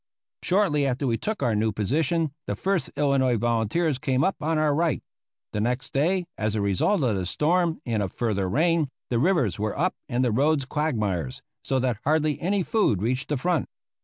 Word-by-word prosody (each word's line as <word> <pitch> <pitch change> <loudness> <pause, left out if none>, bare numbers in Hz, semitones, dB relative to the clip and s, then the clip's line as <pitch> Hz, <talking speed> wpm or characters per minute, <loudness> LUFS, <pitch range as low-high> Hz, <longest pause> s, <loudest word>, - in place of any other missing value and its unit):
Shortly 170 -7 +2
after 130 +2 -1
we 115 -3 +1
took 215 -8 -3
our 120 -3 +2
new 110 +1 +1
position 150 - 0
the - - -1
First 195 -2 -1
Illinois 135 -4 +2
Volunteers 120 +7 0
came 135 -2 +1
up 195 - +1
on 160 +1 0
our 155 -1 +2
right. 165 -1 0 0.5
The 105 - -1
next 125 +4 -2
day, 175 +6 +1
as 110 0 0
a - - 0
result 100 - +1
of 115 -5 +2
the 95 -2 -2
storm 165 - +1
and 115 -4 0
of 95 - -2
further 100 -5 -1
rain, 160 - +2 0.2
the 120 - +2
rivers 145 - +2
were 105 0 -2
up 180 +5 +1 0.2
and 125 0 +1
the 120 - +1
roads 140 +4 +2
quagmires, 105 - -2 0.2
so 135 - 0
that 125 -4 0
hardly 155 +1 +1
any 190 +2 +1
food 190 - +1
reached 125 +5 -1
the 150 - 0
front. 170 +2 0
135 Hz, 190 wpm, -25 LUFS, 115-160 Hz, 0.5 s, Shortly